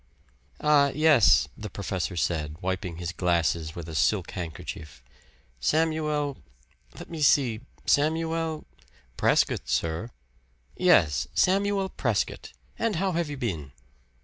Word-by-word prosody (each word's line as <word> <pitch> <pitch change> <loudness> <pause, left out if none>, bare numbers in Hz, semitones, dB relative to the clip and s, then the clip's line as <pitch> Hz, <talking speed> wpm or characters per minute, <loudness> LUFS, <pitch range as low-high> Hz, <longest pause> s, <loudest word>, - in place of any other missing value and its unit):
"Ah, 150 -2 +5
yes," 155 -7 +5
the 105 -1 -7
professor 95 -1 -3
said, 80 -3 -1
wiping 95 -2 -3
his 85 0 -4
glasses 85 -3 0
with 85 -2 -7
a 80 - -7
silk 90 +4 +1
handkerchief. 80 -6 -7 0.6
"Samuel 150 - 0 0.6
let - - -9
me 165 -2 -7
see 125 -6 +3 0.2
Samuel 160 +1 0 0.3
" - - -32
"Prescott, - - +2
sir." 80 +8 -1 0.7
"Yes 85 - +3
Samuel 195 +1 +2
Prescott. - - -2 0.3
And 225 -3 0
how 190 +3 0
have 170 -2 -1
you 145 - -5
been?" 80 - -4
110 Hz, 120 wpm, -26 LUFS, -, 0.7 s, Ah